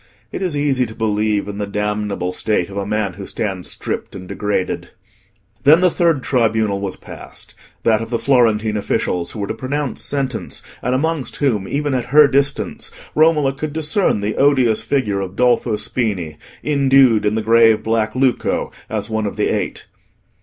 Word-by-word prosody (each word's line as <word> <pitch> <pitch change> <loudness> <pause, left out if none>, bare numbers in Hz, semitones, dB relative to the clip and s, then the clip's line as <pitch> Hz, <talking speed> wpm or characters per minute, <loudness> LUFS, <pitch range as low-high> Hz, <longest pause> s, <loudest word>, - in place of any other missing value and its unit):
It - - -5
is 175 -6 -1
easy 135 -4 +1
to 110 - -10
believe 105 -2 0
in 105 0 -6
the 100 - -2
damnable 105 -2 -2
state 100 -1 -1
of 100 - -7
a 100 0 -2
man 105 -3 -1
who 100 +2 -8
stands 95 -5 -3
stripped - - -4
and 95 -1 -8
degraded. 100 0 -2 0.7
Then 155 +5 +6
the 180 -1 +4
third 165 -7 +1
tribunal 110 -5 +1
was 100 -2 -3
passed—that 110 -1 -4
of 115 - -5
the 120 - 0
Florentine 115 -4 +2
officials 90 -3 -1
who 110 - -7
were 100 - -1
to - - -2
pronounce 130 +3 -3
sentence, 135 -4 -3 0.2
and 125 +2 0
amongst 160 0 -1
whom, 110 -9 0
even 145 0 -1
at 125 -2 -1
her 145 +4 +6
distance, 135 -7 -1 0.2
Romola 150 -3 +3
could 145 +2 -5
discern 155 - +1
the 105 +1 -2
odious 130 -6 +3
figure 110 -5 0
of 95 0 -6
Dolfo 120 -2 +2
Spini, 105 -8 -3 0.3
indued 135 -6 +4
in 105 +1 +1
the 110 - -1
grave 115 -1 +5
black 110 0 0
lucco, 130 -1 0 0.2
as 105 -2 -2
one 110 -2 -1
of - - -5
the - - 0
Eight. - - -4
115 Hz, 175 wpm, -19 LUFS, 105-135 Hz, 0.7 s, Then